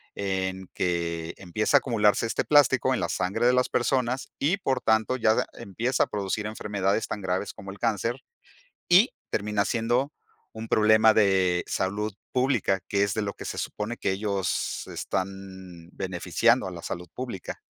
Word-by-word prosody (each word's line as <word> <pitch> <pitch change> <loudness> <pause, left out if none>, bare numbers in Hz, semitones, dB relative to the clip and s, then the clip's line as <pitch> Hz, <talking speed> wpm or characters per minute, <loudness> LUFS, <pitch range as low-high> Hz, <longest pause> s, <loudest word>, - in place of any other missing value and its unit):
en 95 -1 -3
que 85 -2 -2
empieza 105 +9 +2
a - - +5
acumularse 110 -4 +2
este 115 - -1
plástico 130 -3 +4
en 115 - -2
la 85 - -1
sangre 95 +6 -1
de 125 - +5
las 125 0 +2
personas 125 0 0
y, 165 +8 +2
por 135 -9 -1
tanto, 110 +3 +2
ya 110 -2 +2
empieza 115 +6 -1
a - - -2
producir 105 +1 -2
enfermedades 105 -1 -1
tan 105 - -4
graves 95 +2 -2
como 95 - -10
el 100 - -11
cáncer 115 +3 -1 0.6
y 185 +8 +6 0.2
termina 105 -1 0
siendo 120 +7 0 0.4
un 110 0 -7
problema 110 +1 +5
de 95 -4 +3
salud 105 +3 -2 0.2
pública, 125 -7 +1
que 100 0 +2
es 100 - -1
de 110 - -1
lo 100 -1 -2
que - - -9
se - - -4
supone 105 +3 -4
que - - -1
ellos 100 -1 -2
están 95 -3 -5
beneficiando 95 +6 +1
a - - -4
la 85 -2 -8
salud 90 0 -5
pública. 120 -8 -6
105 Hz, 165 wpm, -26 LUFS, 95-120 Hz, 0.6 s, y